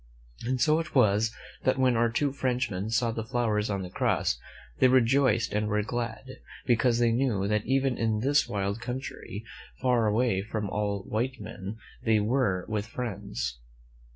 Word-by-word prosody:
And 130 0 0
so 155 +6 +4
it 165 -2 -6
was 110 -2 +4 0.3
that 130 - +2
when 130 -2 +3
our 115 +1 +3
two 140 +5 0
Frenchmen 125 -7 -1
saw 115 +1 +1
the 115 0 -3
flowers 110 -2 0
on 100 -2 -1
the 90 - -6
cross, - - +1 0.4
they - - +6
rejoiced 130 -2 +3
and 105 0 0
were 105 0 +1
glad, 120 +2 -5 0.3
because 120 -1 +3
they 120 -1 +3
knew 115 -5 +1
that 105 0 0
even 135 -1 +1
in 110 -2 +1
this 140 +2 +3
wild 100 0 -2
coun 125 +2 -3
try, 110 -5 -7 0.4
far 125 -4 +2
away 105 -2 +2
from 105 0 -4
all 100 -1 -1
white 120 +6 -2
men, 95 +4 -7 0.3
they 110 -2 +3
were 105 -5 +1
with 105 0 -2
friends. 100 - -4
115 Hz, 170 wpm, -28 LUFS, 105-125 Hz, 0.4 s, they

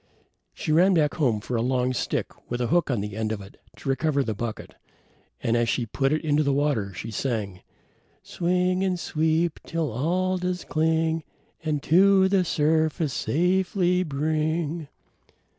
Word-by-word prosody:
She - - -3
ran 180 +4 +5
back 150 -2 +2
home 120 -9 +1
for 120 - -4
a 115 - +1
long 125 +1 +1
stick - - -4
with 120 - -2
a 125 - 0
hook 175 -3 +2
at 120 -6 0
the 105 0 -5
end 110 0 -2
of 110 - -3
it 100 0 -13
to - - -11
recover 140 +1 +1
the 110 - -2
bucket, 110 +1 -6 0.7
and 115 - +1
as 120 -1 +2
she 120 +4 0
put 135 +5 0
it 155 +1 0
into 150 0 +3
the 140 -2 +1
water 140 -9 0
she 110 +5 -7
sang: 105 -6 -3 0.6
Swing 180 +1 0
and 185 -2 0
sweep 160 +1 0
till 165 -5 -2
all 180 +9 0
does 180 0 -2
cling 160 0 0 0.4
And 150 -2 -1
to 190 +3 +5
the 190 -1 +3
surface 155 -2 +1
safely 180 +4 +1
bring. 155 +1 -1
155 Hz, 165 wpm, -25 LUFS, 125-175 Hz, 0.7 s, ran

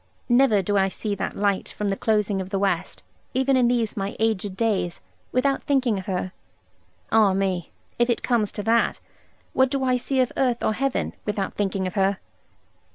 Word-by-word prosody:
Never 240 -5 +4
do 205 +2 +1
I 195 0 +2
see 210 +2 -3
that 200 - -4
light 200 -1 0
from 205 -1 -2
the - - 0
closing 210 -2 +1
of 185 - -6
the 195 - -1
west, 190 -2 -1 0.3
even 265 +1 +3
in 250 -2 +4
these 235 -2 0
my 195 -1 -3
aged 210 -3 -1
days, 205 -6 0 0.3
without 275 +2 +1
thinking 255 -7 +2
of 190 - -9
her. 185 -1 -2 0.8
Ah 215 -3 +5
me, 190 -3 -1 0.3
if 240 +1 +3
it 240 - 0
comes 230 -5 +1
to 205 - -4
that, 230 +2 +2 0.5
what 260 0 +3
do 270 0 -1
I 255 -1 +2
see 260 +2 -1
of 255 -2 +2
earth 245 -3 +1
or 220 - +2
heaven, 270 +3 -1
without 205 -2 -2
thinking 195 -2 -1
of 185 - -3
her? 195 -1 +2
210 Hz, 190 wpm, -24 LUFS, 195-245 Hz, 0.8 s, Ah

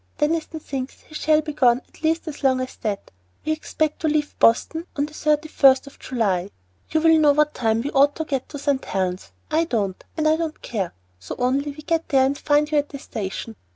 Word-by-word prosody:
Deniston 315 +1 -1
thinks 270 -3 -6
he - - -19
shall 305 0 +3
be 305 -1 -5
gone 250 -4 +4
at - - -21
least 325 +1 0
as 300 -2 -7
long 260 -1 +3
as 255 0 -4
that. 205 -3 -4 0.3
We 310 - 0
expect 310 0 -1
to 320 - 0
leave 300 -1 0
Boston 320 +9 +3
on 285 - +1
the 300 - -12
31st 300 -3 +3
of 280 - -14
July. 200 -7 -1 0.4
You 315 - +1
will 325 0 +6
know 295 -2 +5
what 300 +1 +2
time 225 -1 0
we 285 - -3
ought 285 +1 +4
to 320 - -3
get 270 -4 -3
to - - -6
St. 280 -1 0
Helen's, 185 -1 -2 0.2
I 320 +2 +3
don't, 205 - -2
and 310 0 +2
I 310 +1 +4
don't 320 -2 -3
care, 195 -7 -3 0.2
so 95 - -7
only 265 +4 +1
we 295 +2 -9
get 330 +1 -1
there 265 -2 +4
and 275 +1 0
find 295 +1 +1
you 300 - +4
at 290 - -3
the 280 - -7
station. 220 -2 -5
290 Hz, 220 wpm, -23 LUFS, 255-310 Hz, 0.4 s, will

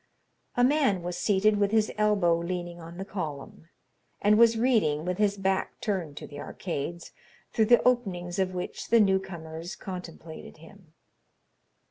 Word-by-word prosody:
A 245 - +4
man 255 - +3
was 175 0 -3
seated 210 +1 +2
with 200 -1 +3
his 215 0 +2
elbow 205 -5 +3
leaning 175 0 -4
on 165 +1 -10
the 190 - -5
column, 160 -4 -6 0.5
and 210 +1 +4
was 230 0 +5
reading 210 - +2
with 180 +2 -2
his 205 -1 +2
back 190 -1 -1
turned 175 -8 -3
to - - -6
the 145 - -10
arcades, 170 0 -5 0.4
through 220 - +3
the 240 +2 +5
openings 195 -8 0
of 185 -1 0
which 180 - -5
the 230 - +5
new 195 -2 +4
comers 170 -2 -8
contemplated 170 -5 -9
him. 165 0 -17
190 Hz, 155 wpm, -28 LUFS, 170-210 Hz, 0.5 s, was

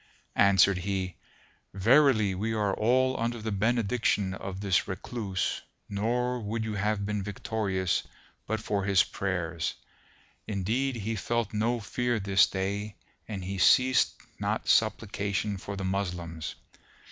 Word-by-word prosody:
Answered 100 -1 +5
he, 95 -1 -2 0.6
"Verily 110 -1 +4
we 110 +4 -2
are 105 -2 +1
all 130 +5 +2
under 120 +1 -1
the 110 0 -3
benediction 110 -2 +1
of 95 0 -6
this 100 -2 +1
Recluse 95 -1 -3 0.3
nor 120 +5 0
would 110 +1 -3
you 110 -1 -3
have 105 0 0
been 105 0 -1
victorious 100 -2 -1 0.5
but 110 +1 -1
for 100 -2 -1
his 95 -2 +4
prayers, 85 -4 -2 0.7
indeed 115 +7 -1
he 110 0 -3
felt 115 +1 -1
no 115 +3 +1
fear 120 +2 -1
this 95 -2 +4
day 100 +2 -3 0.3
and 100 -4 -5
he 95 +1 -4
ceased 130 +6 +5 0.2
not - - -1
supplication 100 -1 +1
for 100 +2 -6
the 95 -1 -4
Moslems. 90 -4 -3
100 Hz, 130 wpm, -28 LUFS, 95-115 Hz, 0.7 s, Answered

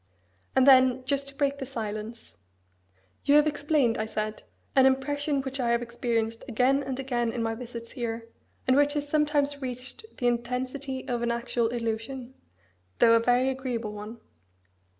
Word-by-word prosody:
And 260 -1 +5
then, 260 -1 +6
just 275 +1 -1
to 275 - -6
break 280 -1 0
the 270 - -3
silence, 220 -2 -6 0.9
"You 285 - +4
have 300 0 +7
explained," 290 -5 +1
I 215 - -1
said, 215 0 -3 0.3
"an 265 -1 +7
impression 280 +1 0
which 270 0 -5
I 240 -2 +1
have 235 0 +2
experienced 230 -1 -2
again 260 +3 +2
and 265 -1 -4
again 240 -3 -1
in 235 -1 -2
my 225 0 0
visits 230 0 -8
here, 230 -2 -4 0.4
and 260 - +5
which 290 +1 +4
has 290 -1 -2
sometimes 290 -1 +1
reached 255 - -5
the 245 - -3
intensity 255 +3 -2
of 240 -2 -1
an 235 - 0
actual 235 0 0
illusion, 235 +2 -4 0.6
though 230 - +6
a 230 - +6
very 245 +2 +3
agreeable 250 -5 -3
one. 210 +3 -8
250 Hz, 165 wpm, -27 LUFS, 235-275 Hz, 0.9 s, have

